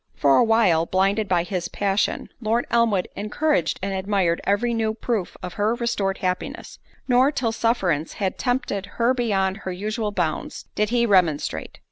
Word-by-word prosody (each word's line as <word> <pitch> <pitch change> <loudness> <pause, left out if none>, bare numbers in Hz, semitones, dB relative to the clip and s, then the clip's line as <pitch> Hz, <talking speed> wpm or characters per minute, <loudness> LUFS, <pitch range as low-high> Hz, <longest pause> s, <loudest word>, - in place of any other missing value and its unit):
For 140 -1 +4
a - - +6
while, 210 -8 +3
blinded 195 +3 +1
by 175 -2 +2
his 175 -1 -3
passion, 200 +2 -1
Lord 230 +2 +1
Elmwood 225 -5 +2
encouraged 215 - 0
and 195 0 -1
admired 190 -3 0
every 220 +4 +1
new 220 -1 0
proof 220 -5 -3
of 180 - -5
her 220 +3 +2
restored 210 -5 -1
happiness; 185 -1 -4 0.3
nor 255 +2 +4
till 245 -6 -1
sufferance 190 -10 0
had 195 -2 -3
tempted 245 -6 -1
her 235 +2 +3
beyond 195 -6 0
her 190 -3 -5
usual 210 +3 -3
bounds, 175 -6 -2
did 210 0 0
he 240 0 +2
remonstrate. 180 -8 +1
205 Hz, 160 wpm, -23 LUFS, 185-230 Hz, 0.3 s, a